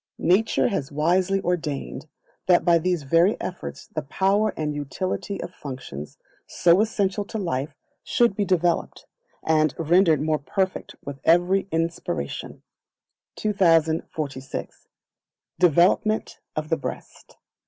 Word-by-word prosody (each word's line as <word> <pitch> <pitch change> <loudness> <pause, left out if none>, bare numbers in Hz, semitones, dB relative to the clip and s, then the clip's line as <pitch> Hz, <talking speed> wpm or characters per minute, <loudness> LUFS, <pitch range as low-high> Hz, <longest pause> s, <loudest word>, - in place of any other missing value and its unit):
Nature 200 +6 +2
has 145 -8 -3
wisely 180 +6 +2
ordained 155 -5 -3 0.4
that 180 -1 +4
by 170 -1 +5
these 175 -2 -1
very 165 +8 +3
efforts 180 - -6
the 155 - -5
power 195 +8 +1
and 150 -1 -2
utility 185 +7 -4
of 180 - -8
functions 130 - -8 0.3
so 175 +2 +4
essential 205 -2 0
to 210 - -6
life 150 -7 -3 0.3
should 235 -4 +2
be 205 - 0
developed, 175 -3 0 0.4
and 155 -2 +2
rendered 165 -1 +4
more 155 +1 0
perfect 185 +7 -2
with 140 -1 -6
every 175 +4 +3
inspiration. 165 - -3 0.7
2046. 160 -8 0 0.7
Development 180 +6 +3 0.2
of 155 0 -3
the 165 - +1
Breast. - - -8
170 Hz, 115 wpm, -24 LUFS, 150-190 Hz, 0.7 s, by